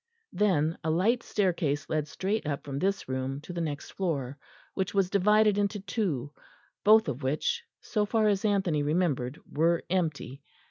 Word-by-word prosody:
Then 165 Hz, -6 st, +1 dB
a 160 Hz, -, -1 dB
light 205 Hz, +10 st, +2 dB
staircase 170 Hz, -7 st, 0 dB
led 155 Hz, -1 st, -1 dB
straight 195 Hz, +2 st, -2 dB
up 145 Hz, -2 st, -2 dB
from 140 Hz, -1 st, -4 dB
this 195 Hz, +4 st, -1 dB
room 130 Hz, +1 st, -3 dB
to 180 Hz, -, -8 dB
the 170 Hz, -, -3 dB
next 150 Hz, -3 st, -4 dB
floor, 145 Hz, -8 st, -2 dB, 0.4 s
which 190 Hz, +1 st, -2 dB
was 195 Hz, -2 st, +2 dB
divided 210 Hz, +1 st, +4 dB
into 205 Hz, +1 st, 0 dB
two, 185 Hz, -, -2 dB, 0.5 s
both 215 Hz, 0 st, +6 dB
of 140 Hz, -1 st, -3 dB
which, 155 Hz, -, -1 dB, 0.2 s
so 210 Hz, -2 st, -1 dB
far 220 Hz, 0 st, +2 dB
as 200 Hz, -2 st, +1 dB
Anthony 190 Hz, -8 st, +1 dB
remembered, 145 Hz, -4 st, 0 dB
were 165 Hz, +3 st, +1 dB
empty. 155 Hz, -7 st, -1 dB
175 Hz, 165 wpm, -28 LUFS, 145-205 Hz, 0.5 s, both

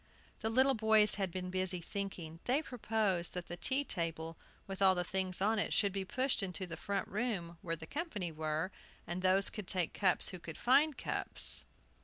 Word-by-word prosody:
The 220 Hz, -, -1 dB
little 260 Hz, +4 st, +4 dB
boys 220 Hz, -2 st, +4 dB
had 190 Hz, -, 0 dB
been 180 Hz, +1 st, -4 dB
busy 185 Hz, -1 st, +1 dB
thinking. 170 Hz, -3 st, -6 dB
They 270 Hz, +5 st, +2 dB
proposed 215 Hz, -, -1 dB
that 180 Hz, -1 st, -4 dB
the 175 Hz, -, -6 dB
tea 260 Hz, +11 st, +1 dB
table, 165 Hz, -, -3 dB, 0.3 s
with 195 Hz, 0 st, -7 dB
all 190 Hz, -1 st, +6 dB
the 180 Hz, -, 0 dB
things 185 Hz, 0 st, -2 dB
on, 215 Hz, 0 st, +1 dB
should 200 Hz, -2 st, +2 dB
be 195 Hz, -1 st, -2 dB
pushed 255 Hz, +4 st, 0 dB
into 185 Hz, 0 st, -3 dB
the 165 Hz, -2 st, -6 dB
front 200 Hz, -1 st, -3 dB
room, 195 Hz, -7 st, -3 dB
where 165 Hz, -1 st, -2 dB
the 160 Hz, 0 st, -9 dB
company 210 Hz, -, -4 dB
were; 155 Hz, +3 st, -2 dB, 0.3 s
and 175 Hz, +2 st, -4 dB
those 190 Hz, +1 st, +6 dB
could 210 Hz, -4 st, -7 dB
take 180 Hz, -3 st, +1 dB
cups 185 Hz, -3 st, +3 dB
who 185 Hz, -, -7 dB
could 165 Hz, -2 st, -8 dB
find 285 Hz, +4 st, +3 dB
cups. -, -, 0 dB
190 Hz, 190 wpm, -34 LUFS, 175-220 Hz, 0.3 s, all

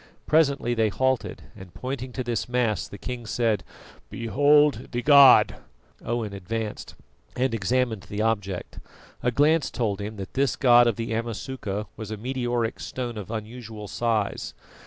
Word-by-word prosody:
Presently 140 Hz, -6 st, +2 dB
they 110 Hz, -2 st, +2 dB
halted, 130 Hz, +3 st, -1 dB
and, 95 Hz, -2 st, -13 dB
pointing 130 Hz, 0 st, -5 dB
to 130 Hz, -, -3 dB
this 120 Hz, -3 st, -2 dB
mass, 115 Hz, -9 st, 0 dB
the 100 Hz, -, -10 dB
king 120 Hz, +3 st, -6 dB
said: 115 Hz, -2 st, 0 dB, 0.5 s
"Behold 145 Hz, +5 st, +3 dB
the 120 Hz, 0 st, -2 dB
god!" 140 Hz, -1 st, +7 dB, 0.5 s
Owen 115 Hz, -3 st, -2 dB
advanced 105 Hz, +3 st, -5 dB, 0.4 s
and 130 Hz, 0 st, 0 dB
examined 115 Hz, 0 st, 0 dB
the 105 Hz, +1 st, -2 dB
object. 100 Hz, -5 st, -2 dB, 0.4 s
A 125 Hz, -, +1 dB
glance 150 Hz, +5 st, +3 dB
told 105 Hz, -4 st, -2 dB
him 105 Hz, +2 st, -5 dB
that 95 Hz, -2 st, -8 dB
this 135 Hz, 0 st, +1 dB
god 120 Hz, -2 st, +6 dB
of 115 Hz, -, +1 dB
the 115 Hz, 0 st, -3 dB
Amasuka 115 Hz, -2 st, -4 dB
was 110 Hz, -2 st, -7 dB
a 110 Hz, -, -4 dB
meteoric 120 Hz, -1 st, -2 dB
stone 120 Hz, -2 st, -5 dB
of 105 Hz, -2 st, -7 dB
unusual 110 Hz, -1 st, -7 dB
size. 110 Hz, -, -1 dB
115 Hz, 150 wpm, -25 LUFS, 105-130 Hz, 0.5 s, god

